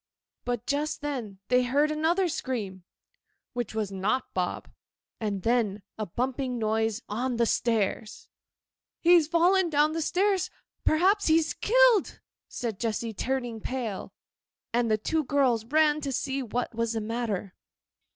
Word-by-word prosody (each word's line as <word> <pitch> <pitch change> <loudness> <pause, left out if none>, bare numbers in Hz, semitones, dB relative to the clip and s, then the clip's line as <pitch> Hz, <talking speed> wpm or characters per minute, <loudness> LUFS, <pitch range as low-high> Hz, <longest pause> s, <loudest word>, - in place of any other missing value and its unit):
But 245 -1 -2
just 300 +2 -1
then 250 -9 -4
they 250 0 +5
heard 285 +5 +2
another 330 +5 +2
scream—which 240 - -6
was 215 -3 -1
not 205 +7 -1
Bob—and 195 +2 -5
then 220 -4 +1
a 215 -1 -4
bumping 255 +4 -2
noise 220 0 0
on 245 +4 -2
the 235 - +3
stairs. 220 -2 -1 0.7
'He's 340 -3 +5
fallen 350 +2 +3
down 305 +2 +2
stairs. 380 +3 +1 0.3
Perhaps 380 +6 +3
he's 320 0 +3
killed,' - - +3 0.3
said 225 -5 -4
Jessy, 225 0 -2
turning 245 0 -2
pale. 235 -6 -4 0.6
And 240 -1 +2
the 215 - +3
two 315 +9 0
girls 255 -5 +2
ran 305 +3 +3
to 280 -2 -3
see 270 +1 -2
what 245 0 -3
was 230 0 -1
the 225 - -2
matter. 215 -4 -3
245 Hz, 130 wpm, -27 LUFS, 220-305 Hz, 0.7 s, they